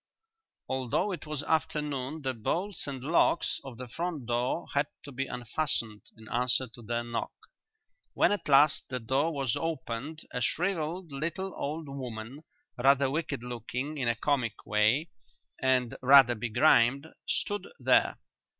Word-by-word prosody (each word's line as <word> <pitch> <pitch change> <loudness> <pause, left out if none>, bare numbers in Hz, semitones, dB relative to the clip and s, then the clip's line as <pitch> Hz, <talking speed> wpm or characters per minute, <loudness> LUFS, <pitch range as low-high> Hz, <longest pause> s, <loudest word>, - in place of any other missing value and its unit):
Although 130 - 0
it 175 -4 -6
was 150 -2 -3
afternoon 150 -2 -1
the 130 -1 0
bolts 175 - -2
and 135 -3 -5
locks 165 +2 +2
of 130 -4 -9
the 130 +1 -7
front 160 +1 -4
door 120 +6 0
had 140 0 +2 0.2
to 145 - -9
be 135 +1 -3
unfastened 120 -3 -1 0.2
in 110 0 -14
answer 125 +2 +2
to 120 - -11
their 120 +1 -2
knock. 120 -1 -3 0.8
When - - +4
at 205 - -2
last 140 +2 +5
the 125 0 -2
door 135 +8 +1
was 135 -6 -1
opened 155 -1 -4
a 125 - -3
shrivelled 170 - -1
little 170 +7 -3
old 155 +2 -4
woman, 125 -2 -6 0.4
rather 135 +1 +4
wicked 150 -4 -2
looking 125 +5 -4
in 125 - 0
a 120 - +2
comic 120 -3 -1
way, 110 +10 +2 0.5
and 130 -2 +2
rather 135 -1 +8
begrimed, 120 +4 +3 0.2
stood 205 -2 -1
there. - - +3
135 Hz, 145 wpm, -29 LUFS, 120-155 Hz, 0.8 s, rather